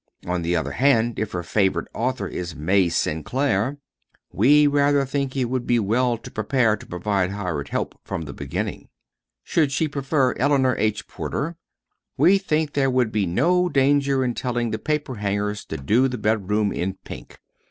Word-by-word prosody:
On 90 Hz, 0 st, -1 dB
the 85 Hz, +1 st, 0 dB
other 80 Hz, -, -1 dB
hand, 120 Hz, -4 st, +2 dB
if 110 Hz, -1 st, -2 dB
her 90 Hz, -1 st, -3 dB
favorite 95 Hz, +2 st, 0 dB
author 125 Hz, -4 st, -2 dB
is 90 Hz, -3 st, -5 dB
May 90 Hz, +4 st, +2 dB
Sinclair, 110 Hz, -, 0 dB, 0.5 s
we 145 Hz, +8 st, +5 dB
rather 145 Hz, -1 st, +3 dB
think 135 Hz, 0 st, -2 dB
it 130 Hz, -, +1 dB
would 125 Hz, 0 st, -3 dB
be 120 Hz, -, +3 dB
well 120 Hz, +3 st, +1 dB
to -, -, -11 dB
be -, -, -30 dB
prepared 110 Hz, 0 st, +1 dB
to -, -, -13 dB
provide 95 Hz, +1 st, -1 dB
hired 90 Hz, -8 st, -3 dB
help -, -, -3 dB
from 80 Hz, -, -4 dB
the 70 Hz, -2 st, -7 dB
beginning. 70 Hz, -1 st, -5 dB, 0.5 s
Should 155 Hz, -5 st, +1 dB
she 145 Hz, +4 st, +1 dB
prefer 140 Hz, -2 st, 0 dB
Eleanor 135 Hz, -2 st, +3 dB
H. 110 Hz, 0 st, -1 dB
Porter, 165 Hz, +4 st, -4 dB, 0.6 s
we 180 Hz, +8 st, +5 dB
think 155 Hz, -5 st, -1 dB
there 135 Hz, -2 st, +2 dB
would 125 Hz, -3 st, +1 dB
be 105 Hz, -4 st, 0 dB
no 180 Hz, -, +2 dB
danger 140 Hz, -1 st, +2 dB
in 120 Hz, -, 0 dB
telling 120 Hz, -2 st, -2 dB
the 110 Hz, -, -2 dB
paperhangers 105 Hz, -8 st, -2 dB
to -, -, -5 dB
do 110 Hz, -, +2 dB
the 125 Hz, -1 st, -4 dB
bedroom 105 Hz, -1 st, 0 dB
in 95 Hz, +2 st, -2 dB
pink. -, -, -10 dB
120 Hz, 175 wpm, -23 LUFS, 100-140 Hz, 0.6 s, we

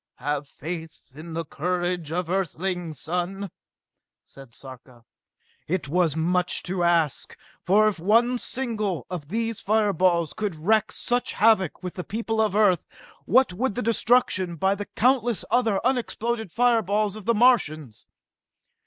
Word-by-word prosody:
"Have 145 Hz, 0 st, -3 dB
faith 160 Hz, 0 st, -8 dB
in 160 Hz, +3 st, -9 dB
the 165 Hz, 0 st, -3 dB
courage 175 Hz, 0 st, -2 dB
of 175 Hz, +1 st, -2 dB
Earthlings, 180 Hz, -3 st, -3 dB
son!" 180 Hz, +3 st, -3 dB, 0.7 s
said 135 Hz, -3 st, -14 dB
Sarka. 125 Hz, -1 st, -12 dB, 0.6 s
It 165 Hz, -5 st, -1 dB
was 165 Hz, -2 st, +1 dB
much 180 Hz, +2 st, 0 dB
to 180 Hz, 0 st, -3 dB
ask, 170 Hz, -4 st, +1 dB, 0.3 s
for 210 Hz, +4 st, +4 dB
if 205 Hz, -5 st, -1 dB
one 235 Hz, +7 st, +3 dB
single 225 Hz, -8 st, -2 dB
one -, -, -9 dB
of 165 Hz, -6 st, -5 dB
these 225 Hz, +4 st, -2 dB
fire 210 Hz, -1 st, +1 dB
balls 170 Hz, -3 st, +1 dB
could 210 Hz, -5 st, -3 dB
wreak 215 Hz, +7 st, +1 dB
such 245 Hz, 0 st, 0 dB
havoc 200 Hz, -6 st, +2 dB
with 180 Hz, -, -5 dB
the 180 Hz, -, -6 dB
people 225 Hz, +2 st, -2 dB
of 210 Hz, -3 st, 0 dB
Earth, 200 Hz, -6 st, +3 dB, 0.4 s
what 255 Hz, -5 st, +3 dB
would 235 Hz, +4 st, -1 dB
be 245 Hz, -, -3 dB
the 230 Hz, -, +1 dB
destruction 215 Hz, -7 st, +2 dB
by 190 Hz, +5 st, +1 dB
the 205 Hz, 0 st, -6 dB
countless 245 Hz, -2 st, +1 dB
other 225 Hz, -5 st, +2 dB
unexploded 235 Hz, -4 st, -1 dB
fireballs 215 Hz, -3 st, +1 dB
of 215 Hz, -3 st, -10 dB
the 235 Hz, -, +2 dB
Martians? 155 Hz, -, +1 dB
190 Hz, 150 wpm, -24 LUFS, 165-220 Hz, 0.7 s, for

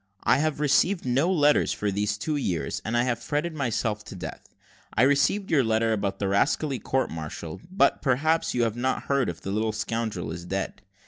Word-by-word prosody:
I -, -, +4 dB
have 155 Hz, -1 st, 0 dB
received 160 Hz, +5 st, +2 dB
no 135 Hz, +8 st, +2 dB
letters 150 Hz, -4 st, +3 dB
for 105 Hz, -1 st, -1 dB
these 105 Hz, +1 st, -1 dB
two 155 Hz, +7 st, -2 dB
years, 95 Hz, -, -2 dB
and 115 Hz, +2 st, -1 dB
I 120 Hz, -, +3 dB
have 120 Hz, -2 st, 0 dB
fretted 150 Hz, +6 st, -2 dB
myself 115 Hz, -6 st, -1 dB
to -, -, -9 dB
death. 90 Hz, -, -8 dB, 0.5 s
I 110 Hz, -, +4 dB
received 145 Hz, +8 st, +2 dB
your 145 Hz, -5 st, +4 dB
letter 110 Hz, 0 st, +2 dB
about 100 Hz, -2 st, -1 dB
the 100 Hz, -, -1 dB
rascally 130 Hz, +7 st, +1 dB
court 130 Hz, +5 st, -1 dB
martial; 80 Hz, 0 st, -6 dB
but, 190 Hz, +2 st, +2 dB
perhaps, 155 Hz, +4 st, +1 dB
you 120 Hz, -, +2 dB
have 115 Hz, -2 st, 0 dB
not 130 Hz, +2 st, -1 dB
heard 140 Hz, -2 st, +1 dB
that 85 Hz, -, -5 dB
the 95 Hz, -, -3 dB
little 110 Hz, +2 st, 0 dB
scoundrel 110 Hz, -7 st, -3 dB
is 85 Hz, +1 st, -6 dB
dead. 95 Hz, +2 st, -3 dB
120 Hz, 200 wpm, -26 LUFS, 105-145 Hz, 0.5 s, I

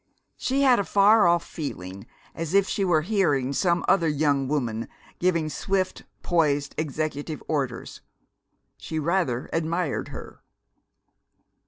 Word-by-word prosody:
She 275 Hz, +2 st, 0 dB
had 255 Hz, -4 st, +5 dB
a -, -, +1 dB
far 205 Hz, 0 st, +5 dB
off 170 Hz, 0 st, +2 dB
feeling 100 Hz, -, -7 dB, 0.3 s
as 165 Hz, +2 st, -3 dB
if 200 Hz, -1 st, +4 dB
she 200 Hz, -, -1 dB
were 165 Hz, -5 st, +2 dB
hearing 150 Hz, -10 st, +1 dB
some 170 Hz, +3 st, +1 dB
other 180 Hz, -3 st, +3 dB
young 145 Hz, -2 st, +1 dB
woman 120 Hz, -6 st, -2 dB, 0.3 s
giving 170 Hz, -3 st, +1 dB
swift, 185 Hz, +5 st, -2 dB, 0.2 s
poised, 145 Hz, -5 st, +1 dB
executive 155 Hz, 0 st, -3 dB
orders. 135 Hz, -6 st, -3 dB, 0.8 s
She 160 Hz, -, -6 dB
rather 155 Hz, -6 st, 0 dB
admired 165 Hz, -1 st, -1 dB
her. -, -, -10 dB
160 Hz, 125 wpm, -25 LUFS, 140-185 Hz, 0.8 s, had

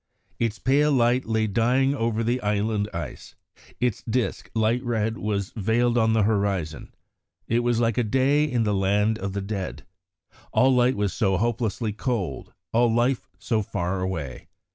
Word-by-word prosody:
"Its 115 Hz, -2 st, 0 dB
pale 145 Hz, +3 st, +2 dB
light 125 Hz, -1 st, +2 dB
lay 110 Hz, -1 st, +1 dB
dying 125 Hz, +6 st, +2 dB
over 115 Hz, -3 st, -1 dB
the 120 Hz, +3 st, 0 dB
'inland 105 Hz, 0 st, 0 dB
ice'; 85 Hz, -3 st, -7 dB, 0.4 s
its 120 Hz, -4 st, 0 dB
disc, 125 Hz, +1 st, -1 dB
light 115 Hz, +3 st, +1 dB
red, 115 Hz, -2 st, -1 dB
was 100 Hz, 0 st, -2 dB
veiled 115 Hz, +3 st, +1 dB
on 110 Hz, -1 st, +3 dB
the 110 Hz, -2 st, +3 dB
horizon; 100 Hz, -6 st, -1 dB, 0.6 s
it 115 Hz, -, +2 dB
was 120 Hz, -1 st, +1 dB
like 115 Hz, -1 st, +1 dB
a -, -, +2 dB
day 135 Hz, +6 st, +2 dB
in 125 Hz, -6 st, 0 dB
the 105 Hz, -1 st, +1 dB
land 105 Hz, +3 st, +1 dB
of 95 Hz, 0 st, -4 dB
the 100 Hz, -, -2 dB
dead. 100 Hz, -2 st, -5 dB, 0.7 s
All 130 Hz, +1 st, +4 dB
light 125 Hz, +1 st, +3 dB
was 100 Hz, -3 st, -1 dB
so 95 Hz, -2 st, +1 dB
hopelessly 115 Hz, 0 st, -1 dB
cold; 110 Hz, -3 st, -3 dB, 0.2 s
all 120 Hz, 0 st, +4 dB
life 120 Hz, +2 st, +1 dB
so 110 Hz, -3 st, 0 dB
far 95 Hz, -1 st, -2 dB
away. 80 Hz, -8 st, -4 dB
110 Hz, 165 wpm, -25 LUFS, 100-120 Hz, 0.7 s, All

